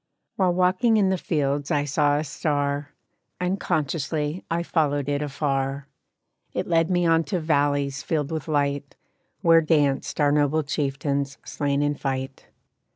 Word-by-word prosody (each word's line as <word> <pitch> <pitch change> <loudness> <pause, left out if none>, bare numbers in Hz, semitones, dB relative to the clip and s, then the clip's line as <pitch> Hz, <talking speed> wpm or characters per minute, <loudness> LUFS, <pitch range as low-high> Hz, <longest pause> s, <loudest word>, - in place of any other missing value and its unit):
"While 180 -3 +2
walking 185 +5 +3
in 195 -3 +3
the 190 - +2
fields 145 -3 -1
I 145 0 +1
saw 145 0 +2
a 150 - -1
star; 145 -1 -1 0.5
Unconsciously 160 -3 -1
I 170 +1 0
followed 145 -5 0
it 145 0 0
afar 140 -1 -2 0.7
It - - -2
led 165 0 +2
me 175 -1 +2
on 165 0 +4
to 185 -4 -1
valleys 145 -3 +1
filled 150 -2 -2
with 160 -1 -4
light, 145 -2 -1 0.5
Where 165 0 +6
danced 150 -4 +1
our 145 -1 +4
noble 150 +1 +2
chieftains 140 -1 -2
slain 140 0 -1
in 145 0 +1
fight. 135 -2 -4
145 Hz, 145 wpm, -24 LUFS, 140-165 Hz, 0.7 s, Where